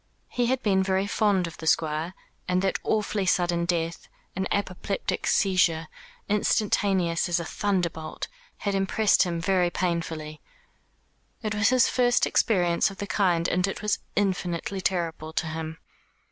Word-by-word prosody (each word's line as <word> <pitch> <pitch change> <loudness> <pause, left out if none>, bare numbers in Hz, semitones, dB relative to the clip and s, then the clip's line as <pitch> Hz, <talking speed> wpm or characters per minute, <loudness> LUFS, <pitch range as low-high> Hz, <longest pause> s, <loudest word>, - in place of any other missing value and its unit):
He 245 -1 0
had 260 +1 0
been 195 -3 +3
very 190 0 +1
fond 200 -2 +2
of 165 - -8
the 160 - -7
Squire, 160 +3 +1 0.3
and 180 +1 +1
that 195 - 0
awfully 210 -2 0
sudden 175 -1 +2
death, 170 -1 -2 0.3
an 190 +1 -1
apopleptic 200 0 -2
seizure, 170 -5 +2 0.4
instantaneous 195 -4 +1
as 175 - +2
a 170 - -4
thunderbolt, 175 -6 -2 0.3
had 200 - -2
impressed 195 +2 +3
him 175 -3 +1
very 180 0 +2
painfully. 165 -3 -3 1.0
It 215 -1 -1
was 205 -1 +3
his 255 -1 +4
first 245 -1 +3
experience 175 -4 +2
of 195 - -11
the 205 - -4
kind, 180 -5 +1
and 180 +1 +1
it 195 - -5
was 210 -1 +1 0.2
infinitely 190 -1 -1
terrible 165 -4 -2
to 165 - -1
him. 160 0 -5
185 Hz, 145 wpm, -26 LUFS, 170-200 Hz, 1.0 s, his